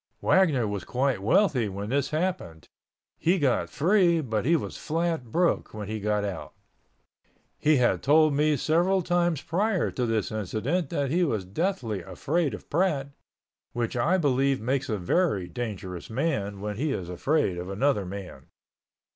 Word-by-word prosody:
Wagner 155 - +3
was 100 -3 -3
quite 130 0 0
wealthy 125 - +2
when 100 +2 -5
this 140 0 +1
happened. 155 - -3 0.5
He 175 +4 +2
got 140 -7 +1
free 175 +1 +3
but 110 -7 -2
he 165 +4 +4
was - - -3
flat 160 -6 -2
broke 175 -7 +1
when 105 -2 -5
he 110 +1 -3
got 105 0 0
out. 95 -4 -6 1.1
He 155 +1 +4
had 125 -3 +2
told 155 +1 +4
me 150 +1 +2
several 175 +7 +2
times 175 -3 +1
prior 195 +2 0
to 125 -2 -1
this 110 -2 -1
incident 110 - -2
that 140 -5 -1
he 175 +3 +2
was 110 - -1
deathly 115 - -2
afraid 140 - -1
of - - -13
Pratt, 150 -5 0 0.6
which 120 -1 -2
I 160 +10 +2
believe 135 -4 +2
makes 135 +4 -1
a 110 - 0
very 100 - 0
dangerous 95 -3 -6
man 110 -7 -2
when 105 0 -4
he 150 +4 -1
is 90 -7 -4
afraid 95 - 0
of 90 +1 -6
another 105 +2 +1
man. 95 0 -8
135 Hz, 160 wpm, -27 LUFS, 105-165 Hz, 1.1 s, he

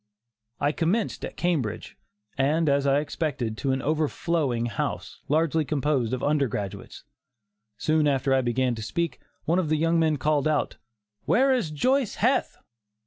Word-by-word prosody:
I 145 +1 +2
commenced 180 +8 -1
at - - -6
Cambridge, 155 - -2 0.4
and, 150 +4 +1
as 140 0 +2
I 140 +1 +3
expected, 140 -7 -3
to 135 - 0
an 130 0 -1
overflowing 150 -4 0
house, 115 -4 -4
largely 160 +1 +2
composed 140 -5 0
of 130 - -3
undergraduates. 135 -10 -2 0.7
Soon 155 +4 +2
after 135 -1 +1
I 135 - +3
began 125 +1 0
to 110 - -6
speak, 165 +4 -2 0.3
one 170 +3 +2
of 165 -5 -1
the 155 - +2
young 165 +2 +2
men 155 -2 +2
called 150 +2 +1
out: 155 -2 0 0.5
"Where 265 +2 +4
is 235 -11 0
Joice 255 - +1
Heth?" 255 +4 +1
150 Hz, 150 wpm, -26 LUFS, 135-165 Hz, 0.7 s, Where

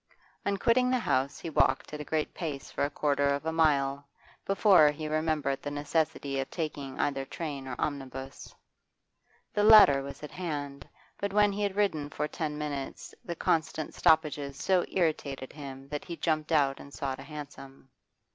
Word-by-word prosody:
On 200 0 +1
quitting 250 +5 +3
the 255 - +3
house 140 - 0
he 165 - -6
walked 150 - +2
at 150 - -5
a - - -4
great 155 +1 -2
pace 150 -5 -5
for - - -1
a 145 - +1
quarter 145 -1 +1
of 140 +2 0
a 160 - 0
mile 140 -3 +2 0.4
before 195 -6 +6
he 155 +1 -4
remembered 155 -3 0
the 145 - -4
necessity 145 -1 -1
of 135 - -3
taking 145 -5 -5
either 140 -2 0
train 140 -2 -5
or 125 - -4
omnibus. 135 -2 -5 1.0
The 205 - +1
latter 210 -11 +8
was 140 +2 -9
at 150 - -7
hand, 145 -6 -5 0.3
but 200 -1 -2
when 205 0 +4
he 200 +1 -4
had 200 -2 0
ridden 160 -8 0
for 150 +1 -2
ten 150 -2 -4
minutes 145 -2 -5
the 170 - -5
constant 155 -1 -1
stoppages 150 -3 +2
so 185 +1 +2
irritated 150 -7 -1
him 135 -2 -9
that 150 0 -4
he 170 -2 -6
jumped 155 -1 -1
out 140 -3 +3
and 140 - -11
sought 135 -1 -4
a - - -8
hansom. 140 -3 -10
150 Hz, 175 wpm, -29 LUFS, 140-165 Hz, 1.0 s, latter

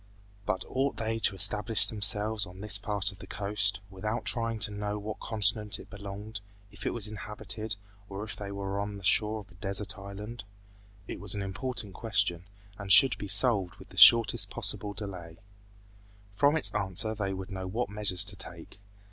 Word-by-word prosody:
But 95 -3 -1
ought 135 +2 -1
they 115 0 -2
to 105 - +2
establish 105 +4 +4
themselves 105 0 +2
on 90 +1 -13
this 105 -1 +2
part 100 0 +1
of 100 - -16
the - - -11
coast, 100 -1 -1
without 105 +4 -4
trying 115 -2 +1
to 105 0 +4
know 105 0 -4
to - - -3
what 105 +1 -6
continent 105 -1 0
it - - -14
belonged, 105 +1 -7 0.3
if - - -7
it - - +2
was 110 -3 -1
inhabited, 105 +1 -4 0.3
or 100 +1 -6
if 110 - -6
they 100 -1 -7
were 100 0 -4
on 100 0 -4
the 100 - -12
shore 110 +3 +2
of 100 - -18
a 90 +3 -20
desert 100 0 -3
island? 100 +3 -8 0.6
It - - -6
was 100 0 +2
an 100 - -3
important 105 +1 -3
question, 95 -6 -1 0.3
and 100 -1 -4
should 135 +5 +8
be 100 - -5
solved 100 -2 +2
with - - -15
the - - -15
shortest 115 -1 +7
possible 100 -1 -4
delay. 90 -5 -8 1.0
From 145 +8 +3
its - - +7
answer 105 +1 -1
they 100 -3 -3
would 95 +1 -6
know 95 -1 -5
what 115 +6 -2
measures 100 -3 +2
to 100 0 -2
take. 90 0 -10
105 Hz, 190 wpm, -29 LUFS, 95-110 Hz, 1.0 s, should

